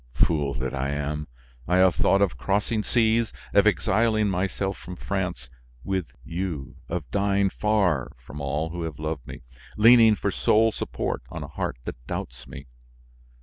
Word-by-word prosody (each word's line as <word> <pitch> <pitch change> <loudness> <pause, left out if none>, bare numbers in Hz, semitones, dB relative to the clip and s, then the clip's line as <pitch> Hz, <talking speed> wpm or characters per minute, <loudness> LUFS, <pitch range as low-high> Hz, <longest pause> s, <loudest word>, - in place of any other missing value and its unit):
Fool 75 -4 +2
that 65 +1 -3
I 70 0 -1
am! 75 +1 -3 0.4
I 90 - +3
have 95 -1 +5
thought 100 +6 +3
of 100 - 0
crossing 105 +2 0
seas, 115 0 +2 0.2
of - - +5
exiling 110 0 +2
myself 95 +1 -1
from 90 - -8
France 90 -9 -3 0.4
with 95 -3 -2 0.2
you, 85 -3 -4
of 80 -8 -4
dying 100 +2 +2
far 100 -10 +1
from 65 +4 -10
all 75 +3 -2
who 85 0 -5
have 80 -2 -4
loved 75 -4 -4
me, - - -9 0.3
leaning 115 0 +7
for 100 - -1
sole 110 +3 +3
support - - -3
on - - -6
a - - -6
heart - - -4
that - - -7
doubts - - -6
me. 65 +1 -9
90 Hz, 160 wpm, -25 LUFS, 75-105 Hz, 0.4 s, leaning